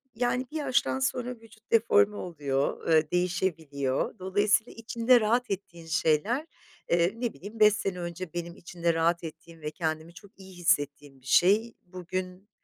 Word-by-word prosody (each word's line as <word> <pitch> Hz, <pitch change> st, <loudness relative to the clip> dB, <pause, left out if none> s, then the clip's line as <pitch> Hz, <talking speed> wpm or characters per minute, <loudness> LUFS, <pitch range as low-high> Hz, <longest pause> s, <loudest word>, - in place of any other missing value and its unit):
yani 250 Hz, +2 st, 0 dB
bir 315 Hz, -, -3 dB
yaştan 265 Hz, -2 st, +1 dB
sonra 250 Hz, -1 st, -1 dB
vücut 225 Hz, -1 st, -20 dB
deforme 220 Hz, -2 st, +4 dB
oluyor, 145 Hz, -7 st, -2 dB
eee, 155 Hz, -1 st, +3 dB
değişebiliyor. 170 Hz, -, -1 dB
Dolayısıyla 205 Hz, +4 st, +1 dB
içinde 230 Hz, +2 st, +3 dB
rahat 235 Hz, +1 st, +1 dB
ettiğin 170 Hz, -4 st, -6 dB
şeyler, 165 Hz, -, +1 dB, 0.4 s
eee, 170 Hz, +2 st, +3 dB
ne 235 Hz, -1 st, -2 dB
bileyim 210 Hz, +3 st, -10 dB
5 210 Hz, -1 st, +7 dB
sene 195 Hz, -3 st, -3 dB
önce 175 Hz, 0 st, -6 dB
benim 170 Hz, 0 st, -5 dB
içinde 170 Hz, -1 st, -2 dB
rahat 165 Hz, +1 st, +1 dB
ettiğim 165 Hz, 0 st, -10 dB
ve 150 Hz, 0 st, -4 dB
kendimi 160 Hz, 0 st, -3 dB
çok 195 Hz, +4 st, -16 dB
iyi 190 Hz, -1 st, -12 dB
hissettiğim 145 Hz, -5 st, 0 dB
bir -, -, -23 dB
şey. 210 Hz, -, +4 dB
Bugün 185 Hz, +2 st, -6 dB
180 Hz, 150 wpm, -28 LUFS, 165-215 Hz, 0.4 s, 5